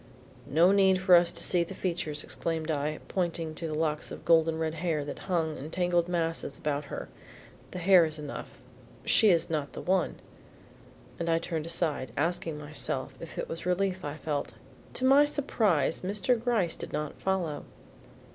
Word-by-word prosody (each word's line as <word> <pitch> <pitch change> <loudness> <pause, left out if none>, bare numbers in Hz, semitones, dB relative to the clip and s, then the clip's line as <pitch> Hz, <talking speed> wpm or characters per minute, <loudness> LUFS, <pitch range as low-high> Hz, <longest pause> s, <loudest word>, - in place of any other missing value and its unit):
"No 165 +6 +5
need 190 -2 +5
for 185 -1 +4
us 175 0 +7
to 170 - -2
see 175 -1 +2
the 170 - -8
features," 165 -5 -2
exclaimed 165 -1 -3
I, 150 +1 -1
pointing 170 -3 -2
to 165 +1 -4
the 155 - -3
locks 155 -1 -1
of - - -9
golden 165 -1 +4
red 160 -1 -1
hair 160 -5 0
that 145 - -6
hung 160 -4 +1
in 145 +4 -6
tangled 175 0 +1
masses 165 -4 -2
about 150 -1 -2
her. - - -6 0.6
"The - - -7
hair 180 0 +6
is 155 -1 -4
enough; 150 -1 -7 0.5
she 220 - +5
is 170 -3 +3
not 150 -3 -2
the - - -6
one." 190 +1 +1 1.0
And 170 0 -1
I 165 - +4
turned 165 -1 -3
aside, 160 -6 -1
asking 160 0 -1
myself 145 -3 -4
if 165 - -9
it - - -2
was 165 +2 -5
relief 185 0 0
I 145 +1 -4
felt. 145 -1 -3 0.4
To 260 - 0
my 275 +2 +7
surprise 220 - +1
Mr. 200 +5 +1
Gryce 220 -9 +1
did - - -7
not 150 -1 -4
follow. 180 -6 -1
165 Hz, 175 wpm, -29 LUFS, 155-180 Hz, 1.0 s, us